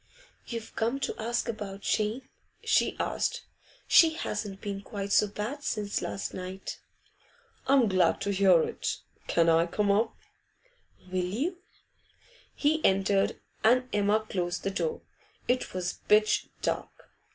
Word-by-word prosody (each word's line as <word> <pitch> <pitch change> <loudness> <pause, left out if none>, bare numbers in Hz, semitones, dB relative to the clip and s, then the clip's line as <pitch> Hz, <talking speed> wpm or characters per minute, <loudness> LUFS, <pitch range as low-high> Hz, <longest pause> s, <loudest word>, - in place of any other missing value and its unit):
'You've 230 -2 -6
come 235 +5 0
to 250 - -2
ask 235 +2 -1
about 205 -3 -5
Jane?' 220 +6 -1 0.4
she - - +2
said. - - -1 0.5
'She 325 -1 +7
hasn't 210 -8 -4
been 200 -1 -4
quite 200 -1 -5
so 210 - +5
bad 215 +8 -5
since 210 -6 -2
last 195 - -4
night.' 185 +1 -6 0.9
'I'm 265 -3 +5
glad 185 -4 +3
to 200 - 0
hear 190 -4 +5
it. - - -3 0.3
Can 170 -1 +3
I 165 +1 +4
come 200 +3 +1
up?' 220 +3 +1 1.0
'Will 185 -1 0
you?' 275 - -2 1.0
He 310 +2 +1
entered, 195 0 +2 0.2
and 250 +3 +4
Emma 210 +1 +2
closed 175 -3 -2
the 195 - -1
door. 465 - -2 0.4
It 250 +1 0
was 180 -1 -2
pitch 215 0 +4 0.2
dark. - - -1
210 Hz, 135 wpm, -29 LUFS, 195-235 Hz, 1.0 s, She